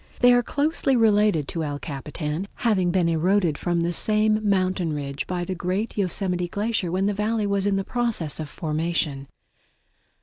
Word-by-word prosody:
They 245 0 +7
are 245 - +5
closely 285 +1 0
related 210 - +3
to 165 - -3
El 145 -1 -3
Capitan, 150 +5 -5
having 195 -7 +1
been 175 -1 +2
eroded 170 0 +2
from 175 +2 -1
the 170 +1 0
same 215 +2 +2
mountain 185 -4 +1
ridge 140 -1 -4
by 180 -1 -2
the 185 - -3
great 185 +5 -2
Yosemite 180 -2 0
Glacier 205 -1 -1
when 190 +2 0
the 205 - +1
Valley 210 +1 0
was 200 0 +1
in 195 -1 +1
process 225 -11 -2
of 155 -2 -5
formation. 155 -4 -2
185 Hz, 165 wpm, -24 LUFS, 165-210 Hz, -, They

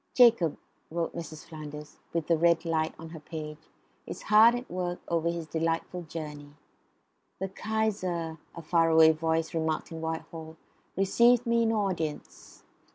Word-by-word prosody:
"Jacob," 230 - +5 0.3
wrote 165 +1 -3
Mrs. 165 -2 -7
Flanders, 150 -2 -9
with 165 -2 -1
the 170 - +3
red 170 +1 +3
light 160 -1 0
on 165 0 -9
her 160 -1 -9
page, 155 0 -8 0.4
"is - - -7
hard 220 +3 +7
at 245 +1 -5
work 175 0 -3
after 170 0 +1
his 170 -1 -3
delightful 165 +2 -2
journey..." 150 -3 -8 0.8
"The 190 +1 -3
Kaiser," 185 -6 -2 0.2
the 170 - -8
far 165 +1 +3
away 160 0 +7
voice 160 0 -1
remarked 160 0 -1
in 165 0 -6
Whitehall, 160 0 -5 0.4
"received 235 +5 +4
me 235 0 +2
in 225 -1 +2
audience." 185 -8 -3
165 Hz, 150 wpm, -29 LUFS, 160-185 Hz, 0.8 s, hard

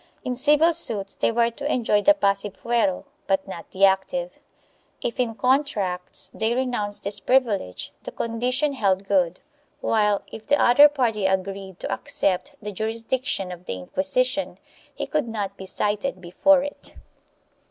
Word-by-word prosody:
In 255 - -1
civil 300 +6 +4
suits 200 -9 +2
they - - 0
were 235 0 +2
to 285 +5 -4
enjoy 220 -4 +2
the 300 +7 +5
passive 200 -5 0
fuero 230 -6 0 0.2
but 195 0 0
not 175 -3 -8
the 195 +1 +4
active; 260 +9 0 0.6
if 235 - -4
in 235 -3 0
contracts 220 -9 0
they 225 +2 0
renounced 245 -6 -2
this 200 +1 -1
privilege 225 - 0
the - - -7
condition 250 +5 -1
held 195 -6 +1
good, 185 -3 +1 0.4
while, 210 -5 +1
if 220 - -10
the 290 - +3
other 285 +5 +7
party 230 -8 0
agreed 190 0 -3
to - - -3
accept 285 -1 -1
the 210 -1 -6
juris 220 +3 -3
diction 255 -7 -2
of 180 0 -10
the - - -2
Inquisition, 250 - -1 0.4
he - - -3
could 300 -5 -1
not 205 -3 -4
be 190 -1 -9
cited 210 +4 -1
before 265 +11 +3
it. 290 - -7
220 Hz, 155 wpm, -24 LUFS, 195-260 Hz, 0.6 s, other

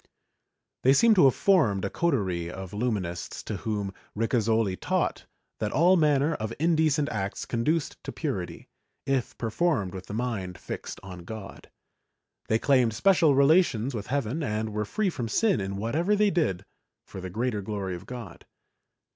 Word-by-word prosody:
They 130 - +5
seem 225 +11 +6
to 185 -8 +6
have 135 - +5
formed 130 - +3
a - - -1
coterie 95 - 0
of 95 +1 -7
Illuminists 100 -6 -3
to - - -4
whom 105 -3 -3 0.2
Ricasoli 110 -3 +1
taught - - -1 0.3
that 105 -1 -1
all 175 +5 +5
manner 150 -2 +3
of 110 -5 -4
indecent 155 -2 +2
acts 100 -2 -3
conduced 145 +7 -1
to - - -4
purity, - - -4 0.4
if 135 -3 -1
performed 115 - 0
with 95 -1 -8
the 105 - -5
mind 105 -7 -3
fixed - - -7
on 90 -2 -8
God; 110 +1 -9 0.8
they 110 - +3
claimed 125 -3 +3
special 170 -5 +4
relations 140 -4 +3
with 105 -3 -5
heaven 140 +2 -1
and 110 -4 -2
were 105 0 -1
free 205 - 0
from 120 -7 -4
sin 200 - +2
in 95 0 -4
whatever 155 - +1
they 205 0 +3
did 100 - 0 0.4
for 95 - -9
the 95 - -5
greater 110 +2 -1
glory 100 -2 -4
of 85 - -8
God. 115 -9 -9
115 Hz, 160 wpm, -27 LUFS, 100-150 Hz, 0.8 s, seem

